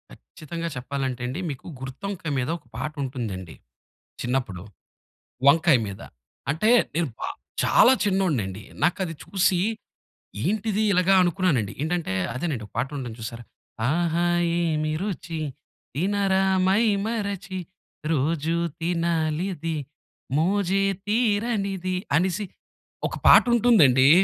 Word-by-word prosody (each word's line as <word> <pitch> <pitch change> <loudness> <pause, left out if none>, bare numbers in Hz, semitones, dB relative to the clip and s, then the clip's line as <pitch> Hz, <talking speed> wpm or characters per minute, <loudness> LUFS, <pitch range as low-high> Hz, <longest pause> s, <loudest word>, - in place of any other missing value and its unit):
కచ్చితంగా 155 - -7
చెప్పాలంటే 130 0 -3
అండి 130 +7 -4
మీకు 135 -3 -7
గుత్తొంకాయ 165 +6 -5
మీద 125 +1 -2
ఒక 150 - -24
పాటుంటుందండి. 125 - -4 0.7
చిన్నప్పుడు 120 -8 -2 0.8
వంకాయ 160 +1 +6
మీద. 100 -1 -7 0.5
అంటే 165 +10 +2 0.3
నేను 165 -2 +1
బ - - -20 0.4
చాలా 255 - +6
చిన్నోడినిండి. 150 - 0 0.2
నాకది 175 -1 +1
చూసి 190 -2 +2 0.9
ఏంటిది 215 +2 0
ఇలాగ 180 0 +3
అనుకున్నానండి. 175 - +1
ఏంటంటే 160 - -1 0.2
అదేనండి 130 -4 -3
ఒక - - -25
పాటుంటుంది 135 -5 -3
చూసారా? 115 +1 -6 0.5
ఆహా! 170 +2 +1 0.3
ఏమి 155 -2 0
రుచి, 175 -5 -4 0.5
తినరా 195 +4 +1 0.2
మైమరచి, 200 -2 0 0.5
రోజు 160 +2 0 0.3
తినాలిది 165 0 -1 0.6
మోజే 195 +3 +2 0.3
తీరనిది 205 -4 0 0.2
అనేసి 185 +4 +1 0.6
ఒక - - -6
పాటుంటుందండి 200 - +6
170 Hz, 95 wpm, -25 LUFS, 135-195 Hz, 0.9 s, వంకాయ